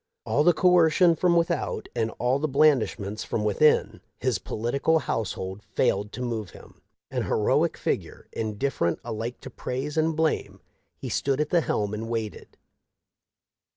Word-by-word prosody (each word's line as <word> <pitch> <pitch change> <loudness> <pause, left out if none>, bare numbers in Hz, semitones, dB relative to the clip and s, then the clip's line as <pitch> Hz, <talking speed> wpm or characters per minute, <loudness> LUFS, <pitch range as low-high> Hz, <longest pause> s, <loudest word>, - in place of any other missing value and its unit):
All 150 - +2
the 175 - +6
coercion 175 -1 +4
from 175 +1 +2
without, 170 -1 0
and 115 -2 0
all 125 +3 +1
the 155 - 0
blandishments 130 -8 +2
from 105 - -2
within, 105 +9 +2 0.2
his - - 0
political 140 +8 0
household 95 -8 -3
failed 105 -1 0
to 125 - -4
move 115 -5 -3
him. - - -16 0.3
An - - -1
heroic - - +1
figure, - - -3
indifferent 110 -5 -1
alike 115 +3 -4
to - - -9
praise 135 +5 -4
and 160 0 +2
blame, 160 0 -1 0.4
he - - -7
stood 135 0 0
at 150 0 -1
the 175 - +4
helm 105 -8 -1
and 110 +2 -4
waited. 110 -2 -5
125 Hz, 150 wpm, -26 LUFS, 110-155 Hz, 0.4 s, the